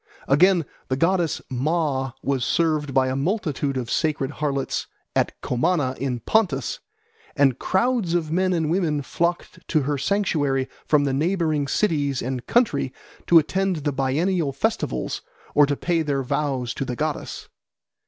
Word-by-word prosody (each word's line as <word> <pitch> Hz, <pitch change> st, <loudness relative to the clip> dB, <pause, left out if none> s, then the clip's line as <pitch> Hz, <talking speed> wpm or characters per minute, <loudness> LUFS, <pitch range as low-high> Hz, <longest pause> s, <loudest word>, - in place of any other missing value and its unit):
Again, 175 Hz, +4 st, +4 dB, 0.2 s
the 130 Hz, -, 0 dB
goddess 170 Hz, +1 st, +1 dB
Ma 135 Hz, -1 st, -1 dB
was 135 Hz, -3 st, 0 dB
served 155 Hz, -1 st, +1 dB
by 130 Hz, -1 st, +3 dB
a 130 Hz, -, -1 dB
multitude 145 Hz, -4 st, -1 dB
of 120 Hz, -3 st, -3 dB
sacred 150 Hz, -3 st, 0 dB
harlots 140 Hz, -2 st, -2 dB, 0.3 s
at -, -, 0 dB
Comana 135 Hz, 0 st, +1 dB
in 125 Hz, -3 st, -2 dB
Pontus, 170 Hz, -, +1 dB, 0.6 s
and 135 Hz, -3 st, +3 dB
crowds 210 Hz, -3 st, +1 dB
of 160 Hz, -3 st, -1 dB
men 185 Hz, +2 st, +2 dB
and 160 Hz, -3 st, 0 dB
women 160 Hz, -5 st, +1 dB
flocked 170 Hz, +5 st, -2 dB
to 155 Hz, -, +2 dB
her 145 Hz, +1 st, -1 dB
sanctuary 145 Hz, -9 st, +1 dB, 0.2 s
from 150 Hz, -2 st, +4 dB
the 140 Hz, -2 st, 0 dB
neighbouring 155 Hz, -1 st, +1 dB
cities 145 Hz, -6 st, 0 dB
and 125 Hz, -1 st, -4 dB
country 180 Hz, -, +2 dB, 0.4 s
to 170 Hz, -, +7 dB
attend 190 Hz, +4 st, +2 dB
the 150 Hz, -2 st, -1 dB
biennial 145 Hz, +4 st, 0 dB
festivals 220 Hz, +12 st, -2 dB, 0.3 s
or 145 Hz, -1 st, +6 dB
to 145 Hz, -, 0 dB
pay 170 Hz, -2 st, 0 dB
their 140 Hz, -3 st, -1 dB
vows 130 Hz, -2 st, -1 dB
to -, -, -3 dB
the 125 Hz, -2 st, -4 dB
goddess. 155 Hz, +3 st, -3 dB
150 Hz, 150 wpm, -23 LUFS, 135-175 Hz, 0.6 s, to